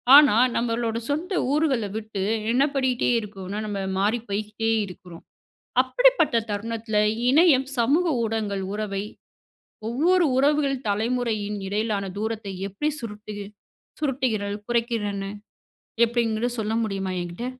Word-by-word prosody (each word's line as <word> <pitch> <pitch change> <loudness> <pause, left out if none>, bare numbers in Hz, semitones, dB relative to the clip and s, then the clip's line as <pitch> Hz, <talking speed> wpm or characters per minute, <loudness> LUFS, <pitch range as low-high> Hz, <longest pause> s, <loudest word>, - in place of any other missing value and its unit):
ஆனா 290 -7 +8 0.2
நம்மளோட 230 -1 0
சொந்த 325 +7 -1 0.2
ஊர்கள 285 -7 +2
விட்டு 215 -3 -4 0.3
என்ன 260 +3 +4
பண்ணிட்டே 260 -2 +1
இருக்கோன்னா, 200 -2 -6
நம்ம 205 -1 -3 0.2
மாறி 210 +5 +2
போய்ட்டே 215 +2 -1 0.2
இருக்கிறோம். 180 -2 -12 0.6
அப்படிப்பட்ட - - +3
தருணத்தில 220 +1 -2 0.3
இணையம், 285 -3 +5
சமூக 285 +10 +3 0.2
ஊடகங்கள் 215 -3 -2
உறவை, 205 -2 -3 0.8
ஒவ்வொரு 340 +9 +3
உறவுகள் 280 -1 +2
தலைமுறையின் 215 -1 -1
இடையிலான 210 0 -1 0.2
தூரத்தை 220 -3 -3
எப்டி 200 +10 -2
சுருட்டிகி 210 -2 -7 0.5
சுருட்டுகிறல் 245 -8 -1
குறைக்கிறன? 230 -4 -1 0.8
எப்டிங்கிறது 235 0 +1
சொல்ல 220 0 -1
முடியுமா? 195 -3 -2
எங்கிட்ட. 175 +7 -5
225 Hz, 105 wpm, -24 LUFS, 205-255 Hz, 0.8 s, ஆனா